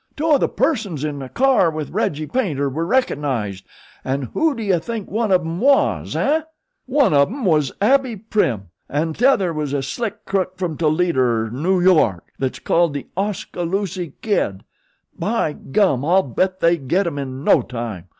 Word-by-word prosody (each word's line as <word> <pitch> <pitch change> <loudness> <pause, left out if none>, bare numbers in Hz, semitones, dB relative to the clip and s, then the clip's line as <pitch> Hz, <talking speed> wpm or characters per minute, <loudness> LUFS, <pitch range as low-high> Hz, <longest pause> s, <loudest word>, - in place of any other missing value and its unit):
"Two 315 +1 0
of 290 - +5
the - - +1
persons 220 - -1
in 150 -2 -3
the 130 -1 -7
car 260 - +3
with 155 -2 -5
Reggie 155 +1 -1
Paynter 150 - -1
were 160 +5 -3
recognized, 135 - -1 0.4
an' 135 +1 -2
who 320 -3 +1
do 230 - -5
you 190 -4 +2
think 220 +3 -6
one 220 0 0
of 185 -1 +4
'em 165 +1 -4
was, 275 +4 +2
eh? 310 +3 +2 0.5
Why 280 +2 +3
one 205 - +2
of 140 -1 +5
'em 250 +3 -5
was 150 -6 +2
Abbie 260 +2 +2
Prim 185 - -1 0.2
an' 155 +3 -1
tother 205 - +2
was 150 -2 -3
a 140 -1 -1
slick 220 - -4
crook 185 -1 -1
from 180 -4 -2
Toledo 165 0 +1
er 115 -3 +1
Noo 175 +9 +1
York 155 - +3
that's 130 -1 -2
called 170 -3 +1
The 140 - -4
Oskaloosie 185 -3 -3
Kid. 100 - 0 0.6
By 210 -8 0
gum, 140 -4 +1
I'll 180 +5 +3
bet 185 +9 -1
they 170 +1 +4
get 170 +8 0
'em 145 -4 -3
in 135 0 -5
no - - +5
time. 115 -7 -6
170 Hz, 180 wpm, -20 LUFS, 140-210 Hz, 0.6 s, of